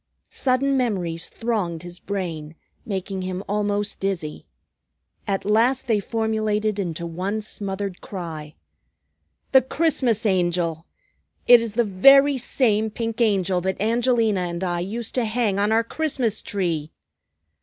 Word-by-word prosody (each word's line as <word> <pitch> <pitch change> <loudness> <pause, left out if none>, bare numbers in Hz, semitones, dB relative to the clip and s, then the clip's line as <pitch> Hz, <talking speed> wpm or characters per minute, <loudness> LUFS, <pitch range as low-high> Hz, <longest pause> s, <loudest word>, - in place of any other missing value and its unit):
Sudden 270 +1 +1
memories 180 -9 -1
thronged 195 -8 -2
his 175 0 -7
brain, 165 -6 -5 0.3
making 190 -1 -3
him 185 +1 -4
almost 205 0 -1
dizzy. 185 -6 -3 0.8
At 195 -1 -1
last 230 +5 +2
they 220 -3 +2
formulated 215 -1 -1
into 170 -3 -3
one 185 +6 -3
smothered 200 -2 -5
cry. 160 -5 -7 1.0
"The 265 - +7
Christmas 260 -6 0
Angel! 175 -4 0 0.6
It 245 -1 +8
is 225 -2 -5
the 240 - +3
very 275 +8 +6
same 220 -3 +1
pink 230 +1 -4
Angel 190 -5 +2
that 190 +1 -2
Angelina 230 -1 +2
and 175 0 -3
I 175 -1 -1
used 220 +6 -4
to 250 -2 +1
hang 215 -3 0
on 205 +2 +2
our 225 +1 +3
Christmas 250 -5 -1
tree!" 165 -6 -2
205 Hz, 130 wpm, -23 LUFS, 180-230 Hz, 1.0 s, It